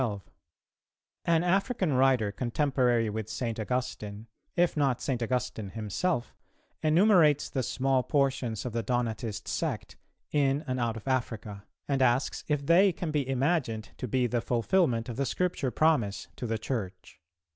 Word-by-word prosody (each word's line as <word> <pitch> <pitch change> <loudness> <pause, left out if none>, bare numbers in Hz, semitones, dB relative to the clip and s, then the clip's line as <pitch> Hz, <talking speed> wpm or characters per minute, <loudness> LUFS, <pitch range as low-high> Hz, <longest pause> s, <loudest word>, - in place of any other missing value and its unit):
An 165 0 +3
African 190 - +1
writer 130 -5 +3
contemporary 125 -1 +1
with 110 0 -4
St. 115 -3 -3
Augustine, 110 -3 -3 0.3
if 175 -1 +2
not 140 -5 +1
St. 130 -4 -2
Augustine 120 -3 -2
himself, 115 - -2 0.5
enumerates 160 -2 +4
the 130 - 0
small 130 +1 +1
portions 130 -6 0
of 125 - -4
the 115 - 0
Donatist 115 -2 -2
Sect, - - -3 0.3
in 140 0 +2
and 130 0 -2
out 115 -1 -1
of 115 - -10
Africa, 110 -6 -2 0.2
and 140 -2 0
asks 125 +1 +2
if 145 -2 0
they 185 +5 +6
can 170 -2 -4
be 145 -3 -1
imagined 130 - 0
to 125 - -4
be 125 +2 +1
the 120 0 0
fulfilment 120 - +1
of 120 -2 -6
the 140 - 0
Scripture 180 -7 -1
promise 125 -9 +1
to 120 - -5
the 115 0 -1
Church. 95 -6 -5
125 Hz, 145 wpm, -29 LUFS, 115-145 Hz, 0.5 s, they